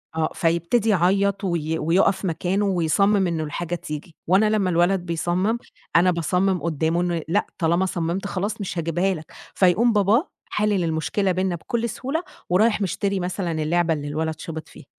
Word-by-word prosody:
آه، 160 -1 +1
فيبتدي 170 +7 +1
يعيط 200 +1 +2
وي 160 -3 -1
ويقف 180 +5 +2
مكانه 185 +4 0
ويصمم 195 +2 +2
إنه 165 -2 -1
الحاجة 170 +3 -3
تيجي. 150 0 -7
وأنا 195 +5 +4
لمّا 210 -4 +1
الولد 175 +2 +3
بيصمم، 175 +5 -1 0.4
أنا 180 +2 +5
باصمم 180 +2 0
قدامه 165 +1 0
إنه 175 -2 -1
لأ، 200 +6 +1
طالما 170 +2 +2
صممت 175 +2 -2
خلاص 205 +3 -3
مش 185 - -4
هاجيبها 175 +4 0
لك. 155 -3 -9 0.2
فيقوم 205 +6 +4
باباه 210 - +3 0.2
حالل 210 -3 +1
المشكلة 165 +4 0
بيننا 185 -1 0
بكل 235 +7 -2
سهولة، 285 +10 -3 0.3
ورايح 210 +4 +3
مشتري 195 +1 -1
مثلًا 180 0 -2
اللعبة 165 +1 +1
اللي 145 -1 -4
الولد 155 +1 -3
شبط 160 -1 -6
فيها. - - -14
180 Hz, 160 wpm, -23 LUFS, 165-200 Hz, 0.4 s, أنا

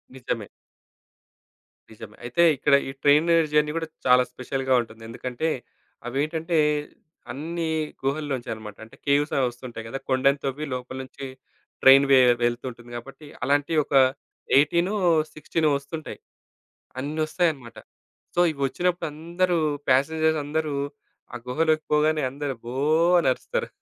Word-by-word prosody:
నిజమే. 120 -5 -4 1.4
నిజమే - - -11
అయితే 120 +8 +2
ఇక్కడ 140 - +2 0.2
ఈ - - -4
ట్రైన్ 150 +3 +5 0.2
జర్నీ 150 0 +3
కూడా 165 -1 -3 0.2
చాలా 125 0 +6
స్పెషల్‌గా 130 +1 -2
ఉంటుంది. 115 -1 -12
ఎందుకంటే, 125 +6 -3 0.6
అవేంటంటే 155 +6 -1 0.7
అన్ని 165 +5 -3 0.3
గుహల్లో 140 +1 -1
నుంచే 120 - -10
అనమాట. 105 -2 -9
అంటే 110 - -14
కేవ్స్ 145 +1 +2
అవి 135 - +3
వస్తుంటాయి 120 -2 -9
కదా, 115 - -4
కొండని 135 +2 +3
తవ్వి 135 +3 -3
లోపల 125 +1 -6
నుంచి 135 +1 -9 0.6
ట్రైన్ 135 +1 +8
వే 135 - +8 0.2
వెళ్తుంటుంది 120 0 -3
కాబట్టి, 135 +5 -11 0.2
అలాంటివి 145 +4 +2
ఒక - - -3 0.6
ఎయిటీనో, 170 +7 +2 0.4
సిక్స్‌టీనో 155 +1 0
వస్తుంటాయి. 150 +3 -8 0.8
అన్నీ 145 +4 -4
ఒస్తాయన్నమాట. 150 -9 -1 0.6
సో, - - +1
ఇవోచ్చినప్పుడు 160 +6 -1
అందరూ 170 +3 0 0.3
ప్యాసెంజర్స్ 155 +4 +2
అందరూ, 155 0 -2 0.6
ఆ - - -5
గుహలోకి 155 +4 +1
పోగానే 155 +1 +3
అందరూ 140 0 -4
"బో!" 120 - -6 0.5
అనరుస్తారు. 130 -6 -1
140 Hz, 120 wpm, -25 LUFS, 130-155 Hz, 1.4 s, ట్రైన్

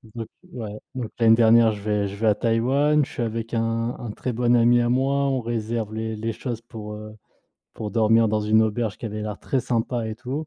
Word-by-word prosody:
Donc 115 -2 -5 0.3
ouais, 110 -4 -6 0.2
donc 120 -4 -4
l'année 115 -1 +6
dernière 115 0 +5
je 105 - -8
vais 105 -1 0
je 100 - -7
vais 110 +2 0
à 105 - +4
Taïwan, 135 +7 +2
je - - -6
suis 120 - -3
avec 115 0 -4
un 115 +1 -1
un 120 - -5
très 125 - -4
bon 120 +1 +2
ami 120 +1 +5
à 120 0 +1
moi, 135 +3 +1
on 135 -2 0
réserve 115 -1 -3
les 110 0 -3
les 110 +1 -3
choses 115 0 -5
pour, 110 -2 -8
heu, 105 0 -9 0.6
pour 105 -1 -5
dormir 115 0 +4
dans 110 0 +1
une 110 +1 +4
auberge 110 -1 -1
qui - - -5
avait 105 0 -5
l'air 105 -1 -5
très 130 - -1
sympa 120 -1 -1
et 110 - -4
tout. 130 +7 -5
115 Hz, 230 wpm, -24 LUFS, 110-120 Hz, 0.6 s, l'année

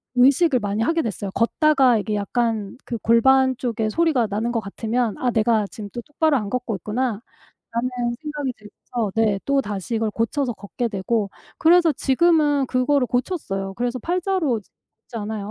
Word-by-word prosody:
의식을 265 +3 +4
많이 205 0 -2
하게 330 +7 +1
됐어요. 205 -3 -4
걷다가 260 0 +3
이게 210 +1 -2
약간 220 0 -1
그 235 - -4
골반 260 +4 +4
쪽에 225 -3 -1
소리가 305 -2 +2
나는 215 +4 -2
것 235 - 0
같으면 225 +2 -2
'아 250 - +1
내가 220 -2 +2
지금 205 0 -9
또 240 - -4
똑바로 305 +2 +1
안 210 -4 -3
걷고 245 -1 -2
있구나.'라는 220 +3 -2 1.0
생각이 295 -4 -3
들면서 215 0 -5
네 215 -3 +2
또다시 230 -7 -1
이걸 220 -1 0
고쳐서 240 +4 -1
걷게 215 +4 -4
되고. 205 0 -1 0.3
그래서 340 0 +5
지금은 290 0 +2
그거를 255 +1 +2
고쳤어요. 235 - -2
그래서 245 +1 -1
8 350 +9 -1
자로 345 - 0
이제 205 - -17 0.4
걷지 235 - -8
않아요. 210 -1 -5
240 Hz, 355 characters per minute, -22 LUFS, 215-275 Hz, 1.0 s, 그래서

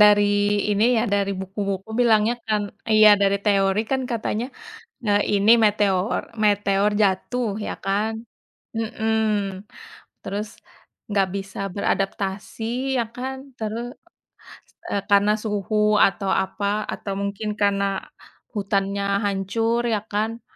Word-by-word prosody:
dari 210 0 +7 0.5
ini, 205 +2 +3
ya, - - +2
dari 200 0 +1
buku-buku 195 +1 -4
bilangnya 225 -1 +4
kan 210 -1 +1 0.3
iya, 215 0 +7
dari 200 0 +3
teori, 195 -1 +3
kan, 265 - +1
katanya, 230 0 -2 0.6
eee, 205 0 +3 0.2
ini 205 +3 +4
meteor 205 0 +2 0.2
meteor 205 0 +2
jatuh, 220 +5 0 0.2
ya, - - -3
kan? 205 +3 0 0.6
Hmm. 220 0 0 1.0
Terus, 205 +2 -4 0.6
enggak 200 -2 +1
bisa 195 0 -6 0.2
beradaptasi, 195 +1 -2 0.3
ya, 240 - +2
kan? 260 +1 -4 0.2
Terus, 225 +2 -4 1.0
eee, 200 - -1
karena 205 +1 +5
suhu 210 -1 -2 0.3
atau 195 0 -2
apa 200 +1 -4 0.3
atau 200 - -5
mungkin 200 +2 -3
karena 200 -1 +2 0.7
hutannya 200 -1 -1 0.2
hancur, 225 +4 0
ya, 210 - 0
kan? 220 +3 -1
205 Hz, 115 wpm, -23 LUFS, 195-220 Hz, 1.0 s, dari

